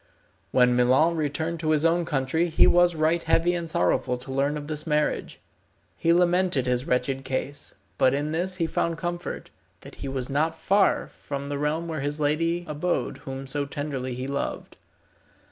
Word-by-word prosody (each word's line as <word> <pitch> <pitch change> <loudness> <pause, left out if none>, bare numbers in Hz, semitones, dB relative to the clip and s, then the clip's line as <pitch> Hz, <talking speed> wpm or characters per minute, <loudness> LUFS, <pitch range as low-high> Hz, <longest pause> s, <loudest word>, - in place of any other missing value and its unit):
When 125 +1 +4
Milon 130 +7 +4
returned 160 +2 -2
to 155 -1 -1
his 155 0 +3
own 170 +1 +3
country 150 +4 0
he 160 - +5
was 175 -1 +4
right 160 +2 +2
heavy 165 +2 +2
and 170 -2 -3
sorrowful 125 - +1
to 130 +2 -8
learn 140 +2 0
of 145 - -6
this 155 +1 -4
marriage. 150 -1 -1 0.6
He 165 - +1
lamented 175 -5 +3
his 125 +1 0
wretched 130 +1 0
case, 135 +2 -4 0.2
but 130 +1 +4
in 145 +2 -2
this 180 +3 -1
he 170 -3 0
found 165 0 -1
comfort, 175 +1 -5 0.3
that - - -12
he 140 - -4
was 135 -2 -3
not 160 +4 0
far 195 +4 +2
from 140 0 -6
the 145 -1 -3
realm 155 +3 -1
where 160 -3 -3
the 145 +1 -6
lady 165 +4 0
abode 155 +4 -2
whom 135 0 -5
so 140 +1 -2
tenderly 140 -3 -4
he 125 +1 -4
loved. 140 +1 -4
150 Hz, 180 wpm, -26 LUFS, 135-165 Hz, 0.6 s, he